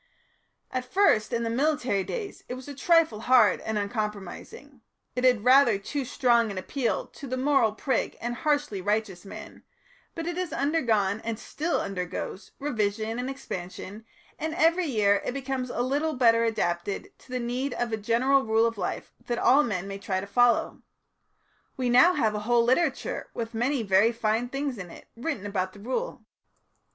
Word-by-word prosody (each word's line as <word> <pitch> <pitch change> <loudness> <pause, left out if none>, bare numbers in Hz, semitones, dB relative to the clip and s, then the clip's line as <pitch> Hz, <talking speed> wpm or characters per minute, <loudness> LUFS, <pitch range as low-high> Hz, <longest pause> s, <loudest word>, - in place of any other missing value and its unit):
At 255 0 -4
first, 375 - +3
in 235 0 0
the 230 - -1
militant 250 -7 0
days, 440 -5 -5
it 250 - -3
was 255 +1 -10
a 285 - -6
trifle 315 -5 +3
hard 230 -4 +4
and 220 -1 -2
uncompromising; 210 +5 -5 0.3
it 250 - -2
had 245 -5 +4
rather 255 -3 +6
too 270 +7 -4
strong 235 -2 +2
an 200 - -6
appeal 275 - -1
to 280 - -11
the 255 0 -3
moral 265 -5 +3
prig 260 +3 -1
and 240 +1 -3
harshly 290 -6 -1
righteous 205 -2 -1
man, - - -10 0.5
but 330 - -4
it 345 0 -3
has 365 -2 -2
undergone, 225 -9 +1
and 230 -1 -3
still 310 +8 -2
undergoes, 185 +1 -5
revision 220 -4 -1
and 250 +1 -3
expansion, 195 -4 -7 0.4
and 315 +1 -3
every 335 +1 +3
year 205 -6 +2
it - - -3
becomes 265 -2 -3
a 240 - -2
little 290 +5 0
better 230 -3 +4
adapted 195 -4 -2
to - - -21
the 255 - -1
need 250 +3 -2
of 240 -1 -2
a 220 - 0
general 240 +6 +2
rule 220 +1 +3
of 230 -2 -2
life - - -4
that 240 - -1
all 270 +4 +5
men 195 -8 -2
may 195 0 -6
try 190 -1 -2
to 190 - -5
follow. 245 +4 +2 1.0
We 250 -2 0
have 345 +9 +6
now 215 -1 +1
a - - -1
whole 235 +2 +2
literature, 255 +8 0
with 230 0 -4
many 245 +2 0
very 200 +3 +4
fine 230 +1 -1
things 275 -3 -3
in 180 -2 -7
it, - - -13
written 235 -4 -4
about 185 -2 -2
the 205 - -13
Rule." 260 - -4
240 Hz, 180 wpm, -27 LUFS, 210-275 Hz, 1.0 s, rather